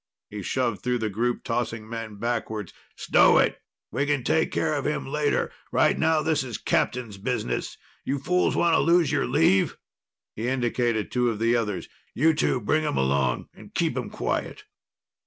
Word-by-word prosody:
He 105 0 -5
shoved 120 +2 -1
through 125 0 0
the 110 -3 -2
group, 120 +4 -1
tossing 115 -2 -2
men 115 -2 -6
backwards. 110 -3 -3 0.2
"Stow - - +5
it! - - +2 0.3
We 140 +6 -1
can 145 -3 +1
take 160 +6 +1
care 155 -1 0
of 145 -2 -1
him 150 - -2
later. 145 +1 0 0.2
Right - - +3
now, 160 -1 +2
this 155 -3 +1
is 120 -4 -5
captain's 115 -6 -1
business. 100 - -2 0.3
You 140 - -1
fools 180 +7 +1
want 170 -1 +3
to - - +4
lose 170 -3 +3
your 145 -3 +1
leave?" 95 +4 +3 0.6
He 115 +3 -3
indicated 120 -3 0
two 125 -1 +2
of 115 - -2
the 115 +2 +2
others. 105 -5 -2 0.3
"You 160 +5 +4
two 150 -4 +1
bring 155 +8 +1
him 150 - -1
along 65 -1 0
and - - -15
keep - - +1
him - - -3
quiet!" - - -3
120 Hz, 175 wpm, -25 LUFS, 110-145 Hz, 0.6 s, Stow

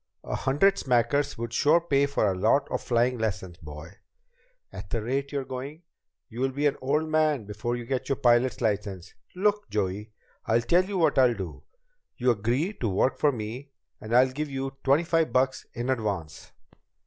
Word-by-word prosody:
A - - -5
hundred 145 +9 +2
smackers 135 +3 +1
would 115 0 -5
sure 155 +7 +4
pay 140 -4 +2
for 140 -6 0
a 100 - +2
lot 110 +9 +2
of - - -1
flying 120 +1 +1
lessons, 95 -5 -3
boy. 80 +3 -11 0.8
At - - -8
the 115 - -1
rate 135 +4 -2
you're 140 -2 -2
going, 135 +5 -7 0.4
you'll 130 +2 -2
be 140 +3 -2
an 145 -1 +3
old 150 +4 0
man 155 -6 +1
before 110 +4 -3
you 120 -1 -6
get 130 +2 -3
your 135 - +2
pilot's 120 +1 +2
license. 100 -5 -2 0.2
Look, 205 - 0
Joey, 105 +1 -2 0.4
I'll 115 +1 +3
tell 175 +10 +3
you 195 0 -3
what 160 -6 +3
I'll 125 -2 +5
do. 95 -6 -7 0.6
You 125 0 +3
agree 120 - 0
to 115 - 0
work 100 +7 +1
for 150 - +4
me, 120 +4 -6 0.3
and 110 - -9
I'll 130 +1 +5
give 150 +3 -4
you 135 0 -4
twenty 140 +5 +3
five 165 -4 +1
bucks 130 +2 0
in 120 +3 -1
advance." 100 -10 -3
130 Hz, 185 wpm, -27 LUFS, 110-145 Hz, 0.8 s, I'll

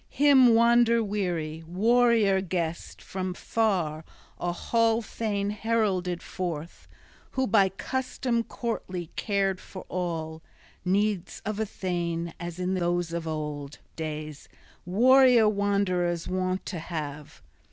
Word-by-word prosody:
Him 265 -5 +6
wander 235 0 +5
weary, 175 -6 -2
warrior 220 +1 +3
guest 170 -3 -4
from 185 -1 -4
far, 180 -11 0 0.4
a 175 - -1
hall 230 +5 +1
thane 205 -2 -2
heralded 205 -5 0
forth, 170 -3 -5 0.5
who 260 0 +1
by 200 -6 +4
custom 240 +4 -2
courtly 185 -9 -4
cared 195 -2 0
for 185 - -10
all 165 -3 -3 0.4
needs 195 0 0
of 215 0 -3
a 220 - 0
thane 170 -3 -3
as 175 -1 -6
in 180 +1 -1
those 175 -2 0
old 150 -3 -4 0.2
days 155 -2 -6 0.4
warrior 250 +3 +6
wanderers 200 -4 0
wont 185 0 -1
to 175 - -4
have. 150 - -6
185 Hz, 110 wpm, -27 LUFS, 170-220 Hz, 0.5 s, Him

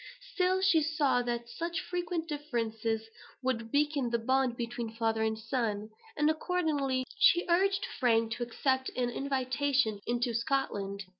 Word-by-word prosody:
Still 370 0 +2
she 380 -5 +4
saw 295 -5 +2
that 240 -1 -3
such 335 +6 -3
frequent 350 -2 -3
differences 230 -7 -2 0.4
would 230 -3 -1
weaken 290 -3 +1
the 235 - +1
bond 255 +1 +1
between 235 -1 -4
father 225 -1 0
and 220 0 0
son; 220 -2 -2 0.3
and, 295 0 +3
accordingly, 310 -6 0
she 355 -4 +5
urged 390 +3 +2
Frank 230 -3 +3
to 235 - -4
accept 260 +2 0
an 245 -1 0
invitation 265 -3 0
into 240 0 0
Scotland. 205 -5 -1
255 Hz, 140 wpm, -31 LUFS, 230-300 Hz, 0.4 s, she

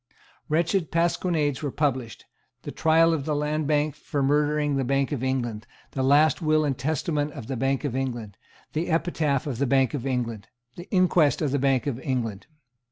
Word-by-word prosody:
Wretched 165 +3 +1
pasquinades 165 -4 0
were 145 - -2
published, 130 -6 -2 0.4
the - - -6
Trial 165 +1 +3
of 145 -4 -2
the 150 - 0
Land 150 +1 -1
Bank 150 0 +1
for 145 0 -3
murdering 150 +1 +1
the 135 - 0
Bank 135 +2 0
of 135 -4 -2
England, 120 -5 -2 0.2
the 135 - -3
last 145 +6 +4
Will 155 -1 +2
and 140 -2 0
Testament 150 +2 -1
of - - -8
the 135 - -4
Bank 135 +3 0
of 140 -4 -2
England, 120 -6 -3 0.4
the 160 +3 -1
Epitaph 160 -4 0
of 130 -5 -4
the 140 - +1
Bank 135 +1 +2
of 135 -2 -3
England, 115 -5 -3 0.3
the 175 - -10
Inquest 175 -6 +3
on 145 - 0
the 140 - +1
Bank 135 -1 +2
of 135 -4 -2
England. 120 -8 -3
145 Hz, 185 wpm, -25 LUFS, 130-155 Hz, 0.4 s, last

